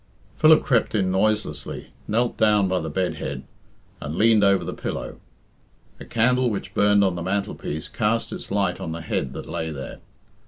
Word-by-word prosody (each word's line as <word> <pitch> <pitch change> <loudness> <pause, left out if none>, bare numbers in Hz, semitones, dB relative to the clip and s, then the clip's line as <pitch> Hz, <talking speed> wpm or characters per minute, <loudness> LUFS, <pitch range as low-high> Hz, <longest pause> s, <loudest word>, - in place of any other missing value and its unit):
Philip 155 0 +6
crept 115 -4 +1
in 95 -3 +1
noiselessly, 95 -7 -1
knelt 115 +3 0
down 105 -3 +3
by 95 0 0
the 80 - -4
bed 90 +4 -1
head, - - -5 0.6
and 75 +1 -4
leaned 110 +1 +4
over 100 -1 +4
the - - -4
pillow. - - -5 0.8
A - - -9
candle 125 +2 +2
which 105 - -5
burned 105 0 +4
on 95 -2 +2
the 85 - -5
mantelpiece 95 -4 -3
cast 115 +1 -1
its - - -7
light 100 -3 0
on 80 - -4
the 85 - -6
head 65 -4 -2
that - - -7
lay 80 0 -3
there. 70 -4 -7
100 Hz, 180 wpm, -23 LUFS, 85-110 Hz, 0.8 s, Philip